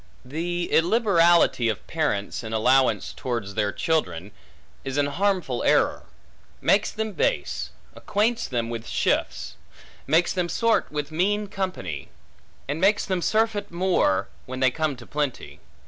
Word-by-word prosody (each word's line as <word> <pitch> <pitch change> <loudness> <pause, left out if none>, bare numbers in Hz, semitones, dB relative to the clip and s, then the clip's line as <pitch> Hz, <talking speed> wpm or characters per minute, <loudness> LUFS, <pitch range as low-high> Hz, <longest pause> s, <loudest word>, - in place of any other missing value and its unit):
The 175 +5 -2
illiberality 170 - +4
of 105 - -4
parents, 135 -11 -2
in 110 0 -6
allowance 130 +4 +2
towards 115 -5 -4
their 105 -1 0
children, 105 - -1 0.5
is 135 0 -4
an 145 - +3
harmful 170 -4 0
error; - - +2 0.5
makes 205 +1 +3
them 220 0 -3
base; - - -1 0.2
acquaints 225 +3 0
them 115 -2 -2
with 115 -1 -5
shifts; - - -1 0.5
makes 165 +3 +3
them 180 -2 -1
sort 230 +3 +1
with 150 0 -3
mean 205 +6 +1
company; 185 - -4 0.6
and 145 +4 -3
makes 200 +2 +3
them 185 -3 -1
surfeit 215 0 +1
more 175 - +1 0.2
when 130 0 -5
they 130 -1 +4
come 155 0 -1
to 120 -1 -12
plenty. 145 -3 -3
160 Hz, 135 wpm, -25 LUFS, 125-195 Hz, 0.6 s, illiberality